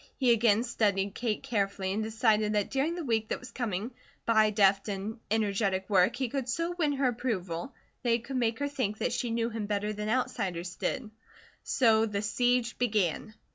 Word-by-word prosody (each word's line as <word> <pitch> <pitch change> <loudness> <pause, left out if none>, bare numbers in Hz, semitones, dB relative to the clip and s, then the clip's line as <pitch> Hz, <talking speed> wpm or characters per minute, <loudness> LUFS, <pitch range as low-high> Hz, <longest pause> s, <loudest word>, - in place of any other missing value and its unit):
He 255 -3 +3
again 230 -1 +4
studied 205 -5 0
Kate 225 -2 -2
carefully 195 -3 -1
and 215 - -1
decided 220 -1 +2
that 205 -1 0
during 285 +5 0
the 350 - -4
week 225 -5 0
that - - -1
was 250 -2 -11
coming, 225 -1 -3 0.3
by 220 -2 +4
deft 200 -1 +3
and 205 +3 -4
energetic 200 -3 0
work 190 +4 +4
he 260 0 -1
could 260 0 -3
so 335 +7 -1
win 305 -5 +1
her 270 -2 +2
approval 210 -4 -3 0.3
that 245 - -1
he 230 - +4
could 255 +3 -5
make 230 -2 +1
her 285 - -1
think 255 -7 -2
that 240 - -1
she 245 -1 -1
knew 230 0 -1
him 220 -2 -4
better 210 0 -1
than 210 0 -4
outsiders 195 -8 -1
did. 215 - -3 0.5
So 225 -3 +3
the 205 -1 -2
siege 245 +3 +1
began. 215 -3 0
220 Hz, 190 wpm, -29 LUFS, 205-245 Hz, 0.5 s, again